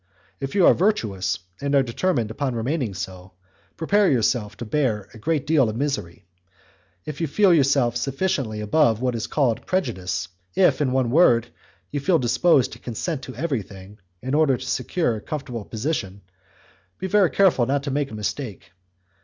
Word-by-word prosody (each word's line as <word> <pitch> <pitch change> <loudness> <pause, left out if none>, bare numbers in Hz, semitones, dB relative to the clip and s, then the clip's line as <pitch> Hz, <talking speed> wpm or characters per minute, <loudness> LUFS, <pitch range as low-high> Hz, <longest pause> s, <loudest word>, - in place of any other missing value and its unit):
If 135 +3 -5
you 190 -4 +5
are - - +8
virtuous, 105 - 0 0.2
and 140 0 0
are 135 - +5
determined 120 -2 -1
upon 130 +1 -2
remaining 120 - -2
so, 95 -1 -7 0.4
prepare 200 +4 +3
yourself 115 -4 0
to 120 - -6
bear 110 -6 0
a 110 - -12
great 155 +3 -1
deal 145 -7 +3
of 110 - -4
misery; 120 -10 -3 0.8
if 150 +1 -6
you 165 - +1
feel 190 +5 +4
yourself 140 -5 +3
sufficiently 135 - -1
above 115 0 +2
what 125 0 0
is 115 -2 -3
called 130 -7 0
prejudice, 95 - -2 0.3
if, 180 -5 +3
in 135 -3 +1
one 130 -2 +1
word, 120 -7 +4 0.4
you 145 - -2
feel 170 +5 +3
disposed 130 +2 +3
to - - -11
consent 135 - -4
to 130 - -9
everything, 105 - -5 0.2
in 130 +1 -3
order 150 -4 +3
to 130 - -8
secure 125 -2 -1
a - - -8
comfortable 125 -5 -5
position, 110 -5 -3 0.8
be - - -5
very 190 -1 +3
careful 175 -12 +3
not 140 +1 0
to 140 - -3
make 140 0 -1
a 110 - -8
mistake. 105 +1 -5
130 Hz, 170 wpm, -23 LUFS, 110-150 Hz, 0.8 s, are